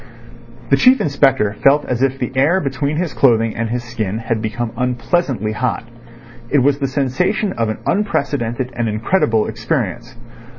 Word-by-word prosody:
The - - +6
Chief 260 +1 +5
Inspector 135 -7 +2
felt 145 +2 +5
as 125 -1 -2
if 135 0 +1
the 125 -2 -3
air 150 +8 +3
between 140 0 -2
his 175 -1 -2
clothing 115 -4 +3
and 115 -1 -2
his 120 +1 -2
skin 110 -4 -3
had 115 -1 -2
become 115 +1 -3
unpleasantly 125 - -1
hot. 115 +1 -2 0.7
It 145 - +2
was 140 +1 +2
the 135 - 0
sensation 165 - 0
of 115 -1 -1
an 110 - -3
unprecedented 135 - -1
and 120 -2 -1
incredible 110 - +1
experience. 115 - -3
125 Hz, 160 wpm, -18 LUFS, 115-140 Hz, 0.7 s, The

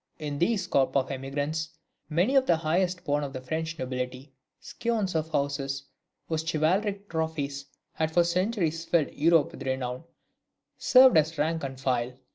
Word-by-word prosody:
In 145 -2 -4
these 195 +1 +1
corps 135 -6 +2
of 135 -1 +1
emigrants, 145 +4 -3 0.4
many 175 - +2
of 265 -1 +4
the 170 - +5
highest 180 +3 0
born 145 0 0
of 140 -1 -5
the 130 - -4
French 160 +5 -3
nobility, 130 +1 -5 0.3
scions 220 -5 -2
of 160 -1 -1
houses 140 -2 -1 0.4
whose 160 -1 -1
chivalric 190 +6 0
trophies 155 -4 -3 0.3
had 160 0 0
for 175 +1 +4
centuries 170 -2 0
filled 165 -3 +1
Europe 160 0 +3
with - - -11
renown, 130 +1 -3 0.7
served 255 -5 +6
as 155 +1 +2
rank 160 +2 0
and 135 -1 -5
file. 125 -2 0
155 Hz, 155 wpm, -27 LUFS, 140-170 Hz, 0.7 s, served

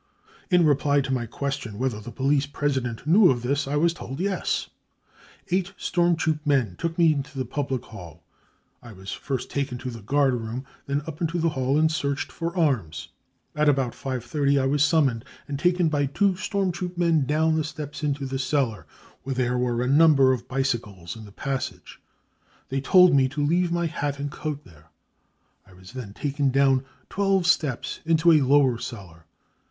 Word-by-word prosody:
In 180 -3 +4
reply 145 -1 +3
to 135 -1 -2
my 120 -3 -2
question 130 -3 -4
whether 125 -3 -1
the 115 +3 -9
police 140 +3 +1
president 135 -5 -2
knew 185 +6 +6
of 120 -3 0
this, 140 +3 0
I 140 - -2
was 165 +3 +2
told 135 -5 -8
£ - - -10
Yes.' 195 +1 -1 0.8
Eight 190 +1 0
storm 175 -1 +1
troop 155 -1 0
men 130 - +1
took 165 0 -3
me 165 -3 +5
to 145 0 -12
the 130 - -1
public 135 -4 -3
hall. 85 -6 -12 0.6
I 120 - -12
was 95 0 -9
first 135 -3 -4
taken 140 -3 -2
tcfthe 115 -4 -8
guard 140 -2 +3
room, 120 +2 -4 0.2
then 140 +1 -1
up 160 +1 -8
into 165 +1 -1
the 165 0 +1
hall 135 -1 0
and 160 +1 +3
searched 140 -2 -2
for 170 +1 -4
arms. 120 - 0 0.5
At 150 0 +3
about 135 -4 +1
5.30 140 +3 -1
I 135 - +1
was 140 +1 +2
summoned, 140 -7 +2 0.2
and 140 -1 -4
taken 175 +1 +2
by 145 -2 +1
two 190 +7 +1
storm 195 0 -1
troop 180 +1 -6
men 165 -5 +2
down 160 +2 +2
the 160 - +1
steps 150 -1 -7
into 145 -1 -1
the 135 0 -3
cellar, 130 -6 -1 0.3
where 135 +1 -4
there 125 -1 0
were 120 -1 0
a - - -1
number 140 -2 +5
of 125 - -5
bicycles 120 -9 -3
in 110 -1 -10
the 100 - -13
passage. 135 +5 -5 0.7
They 135 0 -1
told 180 +5 +6
me 135 -1 +4
to 145 +1 -2
leave 175 +3 +1
my 170 0 0
hat 145 -3 -2
and 140 0 -4
coat 150 -1 -5
there. 80 -3 -19 0.8
I 95 - -18
was 90 0 -14
then 120 -6 -8
taken 140 -1 -1
down 135 0 +3 0.2
twelve 195 -2 +1
steps 155 -8 0
into 165 +1 +4
a 155 -2 +5
lower 135 -3 +3
cellar. 85 -9 -9
140 Hz, 190 wpm, -25 LUFS, 125-155 Hz, 0.8 s, knew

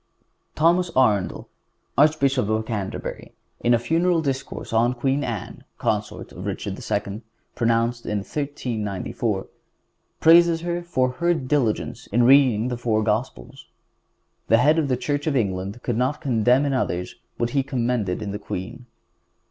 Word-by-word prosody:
Thomas 170 +3 +3
Arundel, 105 -8 +2 0.5
Archbishop 140 -5 +3
of 110 0 0
Canterbury, 105 -4 -5 0.3
in 120 0 +3
a - - +3
funeral 165 +7 +1
discourse 135 -4 -4
on 120 +3 +2
Queen 135 +3 0
Anne, 115 -6 -5
consort - - -2
of - - -7
Richard - - -3
II., 100 +3 -3 0.3
pronounced 115 0 0
in 105 - -1
1394, 115 -7 -3 0.7
praises 165 0 +6
her 175 0 -2
for 130 -7 0
her 170 +6 +1
diligence 130 -5 -1
in 120 +4 +2
reading 125 -3 +5
the 125 - -3
four 110 -2 0
Gospels. 110 +3 -3 0.8
The 115 - +5
Head 150 +7 +4
of 150 - 0
the 130 -2 0
Church 145 +3 -2
of 150 - +1
England 100 -1 -2
could 120 -3 -1
not 130 +4 0
condemn 125 +2 +2
in 140 - 0
others 90 -8 -2 0.2
what 120 0 -1
he 140 - +2
commended 120 -7 -1
in 100 - -4
the 105 - -5
queen. 100 +5 -6
125 Hz, 145 wpm, -23 LUFS, 110-145 Hz, 0.8 s, praises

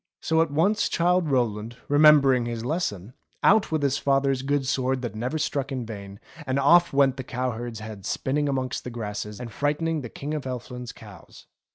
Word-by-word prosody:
So 160 0 +2
at 165 - +1
once 170 +9 +2
Childe 175 -1 +2
Rowland, 115 -3 -1
remembering 145 -4 +5
his 115 -1 -4
lesson, 120 - -3 0.3
out 210 -2 +4
with 155 -2 0
his 140 0 +1
father's 135 -1 +1
good 140 0 0
sword 130 -1 0
that 120 - -3
never 125 +8 -3
struck 145 -3 -2
in 130 -3 -3
vain, 100 -2 -9 0.3
and 130 +1 0
off 170 +5 +5
went 135 -1 +3
the 130 - -4
cow 125 0 -2
herd's 115 -1 -6
head 110 -3 -8
spinning 145 +2 -1
amongst 130 -2 -2
the - - -5
grasses 105 -2 -5
and 120 -2 -7
frightening 150 +5 -1
the 120 - -7
King 145 +6 -6
of 150 -3 -4
Elfland's 125 -1 -6
cows. - - -14
130 Hz, 190 wpm, -25 LUFS, 120-145 Hz, 0.3 s, remembering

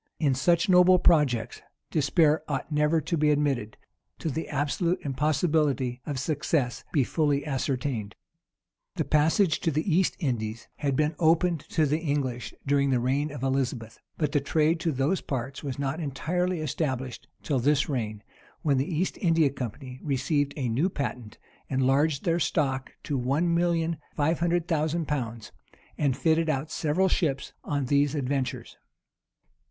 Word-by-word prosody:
In 145 -4 +2
such 165 +6 +2
noble 180 0 +6
projects, 150 -10 +2 0.3
despair 155 +1 +3
ought 145 +2 -3
never 150 +2 +2
to 170 - -2
be 150 -1 +2
admitted, 140 -7 0 0.4
till 160 - -3
the 160 +5 -4
absolute 160 +5 0
impossibility 145 -2 0
of 145 -3 -2
success 135 -2 -1
be 140 - +3
fully 145 +1 0
ascertained. 130 -6 -2 0.8
The - - -1
passage 160 +3 +3
to - - 0
the 155 +1 -1
East 185 0 +2
Indies 115 - -3
had 140 -3 -1
been 150 +3 +1
opened 165 +1 +3
to 160 -2 +2
the 150 +2 +1
English 135 -8 -2
during 140 0 +2
the 130 -2 +2
reign 135 +5 0
of 140 -3 -7
Elizabeth; 130 -4 -2 0.2
but 150 - 0
the 145 - +2
trade 155 +3 +2
to 165 -1 0
those 140 +7 0
parts 135 0 -4
was 135 -4 -4
not 140 +3 -2
entirely 175 +4 -1
established 130 -4 -3 0.2
till 140 -4 0
this 140 +3 +2
reign, 110 -6 -3 0.4
when 145 -3 +2
the 140 +7 -2
East 170 +4 -1
India 165 -5 +3
company 130 0 -6
received 145 0 0
a 130 -4 -1
new 135 +11 +1
patent, 125 - -5 0.3
enlarged 135 +3 +2
their 170 0 +2
stock 135 -5 0
to 140 -3 -2
one 145 +8 +1
million 170 -1 +1 0.2
five 155 +2 +1
hundred 175 0 +1
thousand 160 0 0
pounds,[*] 120 -6 -3 0.4
and 140 -4 0
fitted 160 0 +2
out 155 +1 -1
several 170 +5 +1
ships 150 -7 -1
on 145 -2 -1
these 145 +2 +2
adventures. 135 -2 -2
145 Hz, 155 wpm, -27 LUFS, 130-160 Hz, 0.8 s, noble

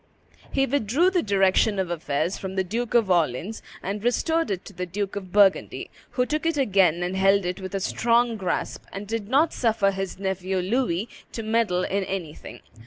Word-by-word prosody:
He 270 -1 +2
withdrew 280 - +2
the 365 -2 +2
direction 200 +1 +3
of 185 -2 -1
affairs 155 +1 -1
from 190 0 -6
the 190 - +1
Duke 230 +6 -3
of 220 -5 +4
Orleans 170 - 0 0.2
and 200 +2 -3
restored 325 +7 +1
it 190 -3 -3
to - - -11
the 180 0 -4
Duke 200 +3 -3
of 190 -3 -6
Burgundy, 200 -1 +3 0.2
who 250 - +2
took 305 +4 -1
it 330 -2 0
again 190 - +3
and 180 +1 -2
held 195 0 +3
it 180 +2 -3
with 190 +1 -5
a - - 0
strong 235 +4 +2
grasp, 190 -4 -3
and 195 +2 -6
did 220 -1 -3
not 290 +6 +3
suffer 220 -4 +2
his 195 -1 -4
nephew 190 -1 -2
Louis 195 0 0 0.3
to 225 - -4
meddle 220 -5 +1
in 195 +1 -1
anything. 160 - -6
195 Hz, 190 wpm, -25 LUFS, 185-230 Hz, 0.3 s, of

